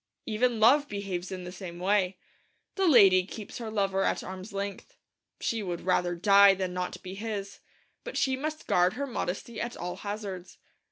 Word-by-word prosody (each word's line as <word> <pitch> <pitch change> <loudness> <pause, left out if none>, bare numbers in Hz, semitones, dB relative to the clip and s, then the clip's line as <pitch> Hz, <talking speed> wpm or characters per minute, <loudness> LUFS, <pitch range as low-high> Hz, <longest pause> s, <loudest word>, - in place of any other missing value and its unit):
Even 230 +1 +1
love 280 +7 +5
behaves 195 -3 -4
in 185 -1 -5
the 180 - -7
same 180 -2 -8
way. 190 0 +1 0.6
The 385 -2 +1
lady 195 - +7
keeps 205 +4 -8
her 230 -2 -5
lover 195 -3 0
at - - 0
arm's 185 +3 -8
length. 200 - -5 0.4
She 225 -1 -1
would 175 -4 -4
rather 180 -1 +1
die 200 +2 +6
than 185 -1 -3
not 180 0 -4
be 185 0 -7
his, 200 -1 -5 0.4
but - - -6
she 265 -2 +2
must 310 +3 -4
guard 180 +1 +3
her 280 +5 -3
modesty 220 -2 -4
at 235 0 -4
all 180 +1 -5
hazards. 200 -3 -6
200 Hz, 175 wpm, -28 LUFS, 185-225 Hz, 0.6 s, lady